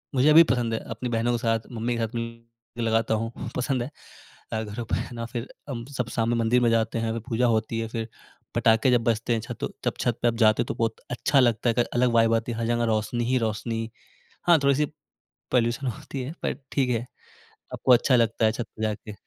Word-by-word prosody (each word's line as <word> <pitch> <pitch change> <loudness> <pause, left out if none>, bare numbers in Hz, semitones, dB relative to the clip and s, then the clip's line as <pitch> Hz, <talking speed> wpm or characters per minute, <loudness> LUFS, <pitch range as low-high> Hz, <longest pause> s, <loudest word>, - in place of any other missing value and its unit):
मुझे 140 +4 +5
भी 165 +2 +10
पसंद 120 -2 -1
है 110 - 0
अपनी 120 +2 -4
बहनों 115 +1 +1
के - - +1
साथ, 115 -2 +1
मम्मी 120 +1 -2
के - - -3
साथ 110 - -4
मिलकर 115 0 -8
लगाता 115 0 +1
हूँ, 115 +1 -2 0.3
पसंद 130 -1 0
है 130 - -7 0.6
अ, 110 0 -1
घरों 110 +3 -5
पे - - -1 0.2
ना 115 0 -4
फिर 120 +1 -5 0.2
हम 115 -3 -4
सब 120 -1 -1
शाम 115 -1 0
में 120 - +2
मंदिर 115 +2 +3
में 120 - +4
जाते 115 0 +1
हैं, 115 0 -1
फिर 115 - -3
पूजा 120 +1 +2
होती 115 0 0
है, 115 - -2
फिर 115 -1 -4 0.5
पटाखे 115 +3 +4
जब 120 -2 +3
बजते 115 +1 +1
हैं, 115 - 0
छतो 120 0 -4 0.2
तब - - 0
छत 120 -1 0
पे 120 - +3
आप 115 - +1
जाते 110 +1 +5
हो - - -11
तो - - -4
बहुत 115 -1 0 0.2
अच्छा 135 +3 +2
लगता 120 -1 +2
है, 115 - +1
एक - - -1
अलग 125 0 +3
वाइब 115 0 +4
आती 115 +1 -1
है, - - -6
हर 115 - -1
जगह 120 0 +1
रोशनी 120 +3 -1
ही 130 +2 +2
रोशनी। 115 +1 -3 0.6
हाँ, 170 -1 +7
थोड़ी-सी 140 +2 +3 0.7
पॉल्यूशन 120 +2 +1
होती 130 +3 -5
है 135 +5 -5
पर - - 0 0.2
ठीक 135 -3 +2
है, 120 -1 0 0.7
आपको 130 - +4
अच्छा 125 +2 +4
लगता 115 -1 +2
है 110 - +4
छत 120 +1 -4
पे 110 - -4
जाके। 110 0 -3
115 Hz, 235 wpm, -26 LUFS, 115-125 Hz, 0.7 s, भी